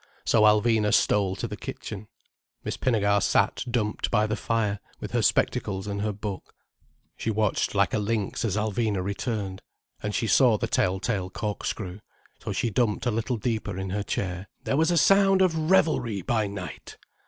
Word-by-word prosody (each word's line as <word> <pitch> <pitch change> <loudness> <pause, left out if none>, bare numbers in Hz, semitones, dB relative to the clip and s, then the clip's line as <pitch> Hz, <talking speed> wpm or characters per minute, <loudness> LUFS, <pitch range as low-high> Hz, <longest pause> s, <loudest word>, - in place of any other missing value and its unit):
So 110 - +3
Alvina 105 0 +4
stole 100 -2 +2
to - - -4
the - - -6
kitchen. - - -7 0.6
Miss - - -3
Pinnegar 100 -5 +2
sat - - +2
dumped 110 -3 -1
by 110 -2 +2
the 105 0 -1
fire, 110 -3 -1 0.2
with - - -6
her - - +1
spectacles 95 -1 +1
and 100 -1 -3
her 105 0 0
book. 100 -1 -7 0.6
She - - -3
watched 110 -1 0
like - - +2
a 110 - +2
lynx 105 -1 -1
as 105 -3 0
Alvina 105 -2 0
returned. 100 -1 -3 0.4
And 105 0 -3
she 120 - 0
saw 120 -1 +5
the - - -1
tell 95 +1 +1
tale 95 -4 -2
corkscrew. 100 -2 -4 0.4
So - - -3
she 115 - -1
dumped 105 +1 0
a 120 - +2
little 115 +3 -1
deeper 110 -3 -2
in 95 -1 -4
her 105 +2 -1
chair. 95 -1 -3 0.2
"There - - 0
was 160 +3 +3
a 175 - +2
sound 195 +4 +5
of 160 -3 0
revelry 125 - +2
by 110 0 0
night!" 95 -2 -8
105 Hz, 175 wpm, -26 LUFS, 100-115 Hz, 0.6 s, saw